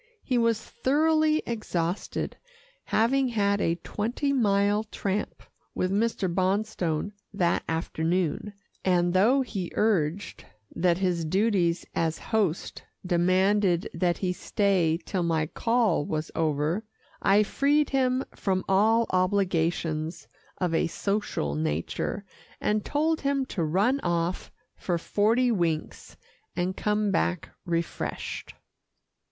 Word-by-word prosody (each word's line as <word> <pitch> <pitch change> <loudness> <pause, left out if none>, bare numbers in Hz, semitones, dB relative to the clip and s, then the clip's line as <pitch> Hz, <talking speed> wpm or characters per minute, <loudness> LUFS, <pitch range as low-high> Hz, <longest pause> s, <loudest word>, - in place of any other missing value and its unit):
He 250 -3 +1
was 230 -2 +2
thoroughly 310 +5 +2
exhausted, 185 -6 -3 0.5
having 260 +5 +2
had 200 -4 +1
a 165 - +1
twenty 235 - -2
mile 205 -3 +2
tramp 205 -1 -3 0.3
with 185 - 0
Mr. 225 +3 0
Bonstone 185 -1 0 0.2
that 175 -4 +1
afternoon, 165 +3 -1 0.3
and 175 -1 +2
though 230 +9 +4
he 195 -8 -5
urged 195 -4 0 0.3
that 175 -1 +2
his 180 -3 0
duties 185 -1 +1
as 160 -1 0
host 205 -7 -1 0.2
demanded 185 +1 +2
that 175 -2 +1
he 180 -2 -1
stay 180 -5 +1
till 185 - -1
my 165 -2 +1
call 225 -2 +1
was 155 +1 -3
over, 155 +5 0 0.4
I 200 +2 +5
freed 285 +7 +1
him 260 -1 +1
from 185 -2 -1
all 220 +4 +4
obligations 175 -4 0 0.3
of 180 -3 -1
a 165 - +2
social 200 - -2
nature, 80 - -2 0.3
and 210 0 0
told 315 +2 0
him 275 -1 0
to 185 -9 -3
run 200 - +2
off 175 -3 -1 0.2
for 175 -2 -1
forty 225 +8 +2
winks, 170 -7 -2 0.4
and 180 +1 -1
come 210 -1 0
back 180 -3 -1
refreshed. 170 -1 -3
195 Hz, 115 wpm, -27 LUFS, 170-220 Hz, 0.5 s, I